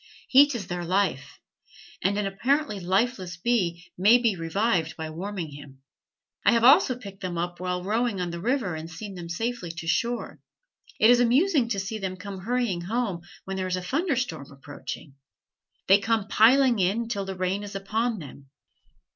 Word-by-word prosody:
Heat 280 +1 +6
is 210 -5 -4
their 175 0 -4
life, 185 -6 -1 0.6
and 200 +3 +1
an 210 - 0
apparently 235 +4 0
lifeless 185 -1 -1
bee 175 -5 -1
may 210 +7 +6
be 230 -5 +1
revived 170 0 0
by 160 -1 -5
warming 175 -1 -5
him. 140 -2 -13 0.6
I - - +5
have 230 -1 +2
also 255 0 +6
picked 200 -5 -11
them 180 -2 -4
up 175 +1 -3
while 180 0 -2
rowing 220 +1 0
on 175 -1 -2
the 170 - -5
river 235 - 0
and 160 +1 -6
seen 195 +5 -8
them 175 -2 -8
safely 225 +1 -3
to 165 0 -7
shore. 235 +8 -1 0.6
It 220 +3 +7
is 245 - +5
amusing 260 +3 +3
to 200 -4 -1
see 215 +3 -4
them 190 -2 -4
come 200 0 -7
hurrying 230 -3 -1
home 200 -2 -2 0.2
when 195 0 -4
there 185 -1 -2
is 185 - 0
a 185 - -4
thunderstorm 255 - -2
approaching. 140 +1 -9 0.7
They 195 +2 +6
come 220 -1 0
piling 245 +2 +5
in 205 +6 +1
till 200 -4 -3
the 190 0 -5
rain 185 +2 -1
is 205 -1 -8
upon 220 +4 -1
them. 140 -4 -11
195 Hz, 180 wpm, -26 LUFS, 175-235 Hz, 0.7 s, It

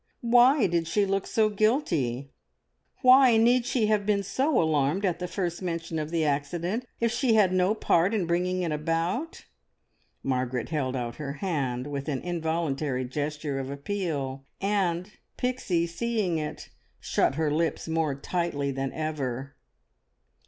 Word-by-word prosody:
Why 245 +2 +6
did 170 -3 0
she 200 +5 +2
look 195 0 -1
so 220 -1 +2
guilty? 170 - 0 0.7
Why 255 -2 +7
need 240 +2 +4
she 245 -4 +1
have 210 -1 +2
been 200 -1 +1
so 270 - +1
alarmed 155 +4 +1
at 180 -3 0
the 180 - -3
first 175 -2 -3
mention 165 -2 -3
of 155 0 -3
the 165 -1 0
accident 170 - -1
if 230 -1 +1
she 235 -1 +2
had 195 -4 +4
no 185 +3 +2
part 180 -3 +2
in 210 -5 0
bringing 180 +2 0
it 165 - -1
about? 165 - -2 0.8
Margaret 125 -2 -1
held 135 -5 -1
out 120 -2 -4
her 140 -2 -4
hand 140 -7 -2
with 140 0 -4
an 135 -3 -2
involuntary 160 -6 -1
gesture 145 +1 -3
of 135 0 -4
appeal, 140 -3 -3 0.2
and 195 -2 0 0.3
Pixie, 245 -9 0
seeing 185 -1 -1
it, 150 -1 -6 0.3
shut - - +1
her 155 -1 0
lips 165 +2 -1
more 160 -3 0
tightly 145 -2 -2
than 135 0 -3
ever. 140 -4 -3
170 Hz, 150 wpm, -27 LUFS, 145-205 Hz, 0.8 s, Why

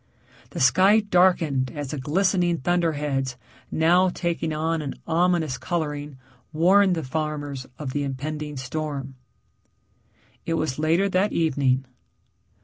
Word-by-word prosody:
The - - -6
sky 190 +10 +5
darkened 175 -9 +2
as 145 -3 -5
the 150 - -4
glistening 175 +4 +1
thunderheads 145 -5 -1 0.3
now 175 +4 +3
taking 170 -2 -2
on 160 +1 -1
an 140 -2 -5
ominous 170 -4 +1
coloring 150 -4 -3 0.3
warned 185 +4 +4
the 160 - -3
farmers 145 -2 -4
of 135 -4 -5
the 145 - -1
impending 150 +2 -4
storm. 135 0 -4 1.3
It 165 - -1
was 155 -4 -2
later 165 +5 +2
that 190 +2 +1
evening. 135 -5 +1
155 Hz, 120 wpm, -24 LUFS, 140-175 Hz, 1.3 s, sky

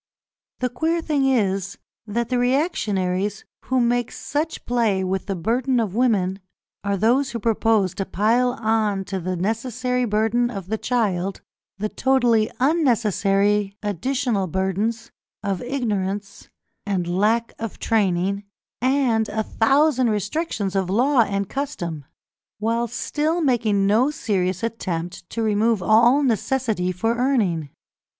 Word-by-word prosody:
The 250 - +1
queer 325 +7 0
thing 300 -4 0
is, 195 -6 0 0.3
that 235 +2 -2
the 250 -1 +1
reactionaries 205 - 0 0.2
who 260 0 +1
make 240 0 +1
such 310 +3 -3
play 225 -6 +1
with 190 +1 -2
the 195 - -1
burden 245 +8 0
of 215 -5 -1
woman, 200 -6 +1 0.4
are 200 -1 0
those 250 +7 +2
who 235 - -4
propose 220 -3 +2
to 195 - -3
pile 240 +5 +2
on 215 -4 0
to 195 0 -3
the 185 +1 -3
necessary 245 +6 -1
burden 225 +2 +1
of 195 -5 -7
the 220 0 -1
child 195 -6 -1 0.4
the 210 +2 -1
totally 240 -3 +2
unnecessary 210 - +2
additional 210 +1 -1
burdens 200 +6 -2 0.3
of 195 -3 -2
ignorance 205 -6 -3 0.3
and 190 -3 -1
lack 215 +6 +1
of 225 -2 -5
training, 200 -2 0 0.4
and 250 -4 +2
a 220 +1 -1
thousand 260 +3 +2
restrictions 210 - -2
of 190 -2 0
law 250 +7 +3
and 200 -2 -1
custom, 175 - -4 0.5
while 230 +3 0
still 305 +8 -1
making 230 -9 +2
no 220 +7 +3
serious 190 - -1
attempt 175 -6 -4
to 230 - -2
remove 215 -1 +2
all 235 +9 +5
necessity 225 -5 0
for 225 +6 -1
earning. 205 - +1
220 Hz, 130 wpm, -22 LUFS, 195-245 Hz, 0.5 s, all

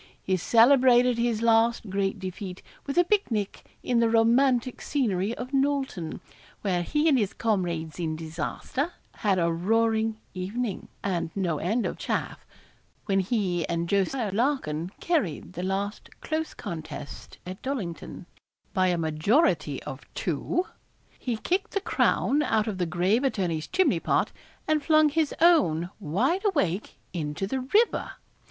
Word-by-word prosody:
He 190 - +1
celebrated 245 +4 +5
his 235 -2 0
last 230 0 +3
great 195 0 0
defeat 185 0 -6 0.2
with 280 - -3
a 350 - +7
pic 405 +3 +1
nic 210 -4 -3
in 245 -2 +2
the 230 -1 +3
romantic 240 +2 +3
scenery 220 -6 0
of 250 +1 -6
Nolton, 270 - -1 0.4
where 185 -4 +1
he 300 - +1
and 275 -5 +5
his 205 -3 -1
comrades 175 -7 -1
in 160 -2 -1
disaster 165 - -3 0.2
had 200 -4 +1
a 170 -1 +2
roaring 220 +4 +1
evening, 200 +4 -3 0.2
and 180 -4 -1
no 175 -6 0
end 220 +8 0
of - - -3
'chaff' - - -3 0.6
When 195 -2 +2
he 185 -4 0
and 170 0 -1
Jos. 200 +6 +1 0.2
Larkin 195 - 0
carried 205 - -1
the 180 - -5
last 195 +3 -3
close 315 0 -3
contest 155 -4 -7
at 185 +1 -7
Dollington, 195 - -5 0.5
by 185 -3 +3
a 175 -1 +1
majority 165 - +1
of - - -9
two, 360 - -1 0.5
he 240 -3 -2
kicked 380 - -1
the 395 - +1
crown 300 -6 +2
out 220 -7 +1
of 210 -4 -4
the 175 - 0
grave 180 - +1
attorney's 175 - -1
chimney 375 0 +2
pot, - - +1 0.4
and 310 -1 +2
flung 310 -1 +5
his 310 0 +1
own 190 - +4
wide 230 - 0
awake 250 - 0 0.2
into 155 +1 -3
the 260 +7 -2
river. 410 - +1
215 Hz, 145 wpm, -27 LUFS, 180-265 Hz, 0.6 s, a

